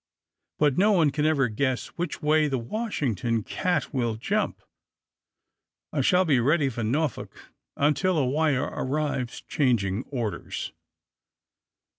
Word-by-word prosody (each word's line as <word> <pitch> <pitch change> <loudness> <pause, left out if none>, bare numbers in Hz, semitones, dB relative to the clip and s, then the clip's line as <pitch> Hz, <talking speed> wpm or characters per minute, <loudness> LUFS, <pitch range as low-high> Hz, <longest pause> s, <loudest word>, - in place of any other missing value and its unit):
But 145 0 +2
no 210 +2 +5
one 160 -6 +4
can 150 +2 +1
ever 140 -5 +3
guess 130 +3 -1
which 170 -3 -5
way 155 0 +3
the 135 -2 -1
Washington 120 - -2
cat 180 - -1
will 120 -4 0
jump. 205 - -2 1.3
I - - +1
shall 185 0 +4
be 140 -6 +3
ready 140 +3 +2
for 120 -2 -5
Norfolk 145 +8 -2 0.3
until 160 +5 +2
a 140 - +2
wire 145 0 +1
arrives 135 -3 -2
changing 120 - 0
orders." 120 -7 -4
145 Hz, 125 wpm, -26 LUFS, 125-155 Hz, 1.3 s, no